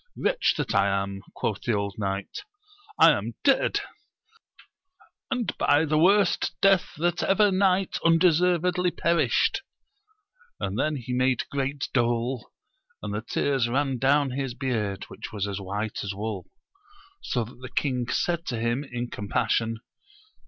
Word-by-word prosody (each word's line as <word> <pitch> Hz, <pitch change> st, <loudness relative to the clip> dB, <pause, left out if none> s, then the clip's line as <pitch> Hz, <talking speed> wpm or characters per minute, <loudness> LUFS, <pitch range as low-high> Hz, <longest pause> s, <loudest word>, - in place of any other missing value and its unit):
Wretch -, -, +1 dB
that 145 Hz, -5 st, -2 dB
I 100 Hz, 0 st, +3 dB
am! 100 Hz, 0 st, -2 dB
quoth 105 Hz, -3 st, -2 dB
the 120 Hz, -, 0 dB
old 100 Hz, 0 st, -2 dB
knight; 100 Hz, -1 st, -3 dB, 0.6 s
I -, -, +8 dB
am -, -, -2 dB
dead! -, -, +3 dB, 1.5 s
and 250 Hz, -4 st, -1 dB
by 150 Hz, +3 st, +4 dB
the 155 Hz, 0 st, +1 dB
worst 195 Hz, +2 st, +3 dB
death 195 Hz, -2 st, +3 dB
that 175 Hz, +2 st, 0 dB
ever 205 Hz, +1 st, +3 dB
knight 190 Hz, 0 st, +2 dB
undeservedly 180 Hz, +1 st, +3 dB
perished! 170 Hz, 0 st, +1 dB, 1.0 s
and 100 Hz, +4 st, -3 dB
then 155 Hz, +2 st, +1 dB
he 125 Hz, -2 st, -5 dB
made 130 Hz, 0 st, +1 dB
great 140 Hz, 0 st, -2 dB
dole, 120 Hz, 0 st, 0 dB, 0.5 s
and 105 Hz, -1 st, -4 dB
the 105 Hz, -, -2 dB
tears 130 Hz, +1 st, 0 dB
ran 135 Hz, 0 st, 0 dB
down 140 Hz, +1 st, +3 dB
his 130 Hz, -1 st, -3 dB
beard 110 Hz, -8 st, -2 dB
which -, -, -8 dB
was 100 Hz, -2 st, -2 dB
as 100 Hz, 0 st, -4 dB
white 100 Hz, +3 st, -4 dB
as 100 Hz, -1 st, -4 dB
wool; 105 Hz, -3 st, -5 dB, 0.7 s
so 120 Hz, -, -1 dB
that 120 Hz, +2 st, -12 dB
the 130 Hz, 0 st, -8 dB
king 125 Hz, -2 st, -1 dB
said 170 Hz, -1 st, 0 dB
to 120 Hz, -, -2 dB
him 120 Hz, +4 st, 0 dB
in 120 Hz, -3 st, -5 dB
com 105 Hz, -3 st, -7 dB
passion. 115 Hz, 0 st, 0 dB
130 Hz, 145 wpm, -26 LUFS, 110-165 Hz, 1.5 s, I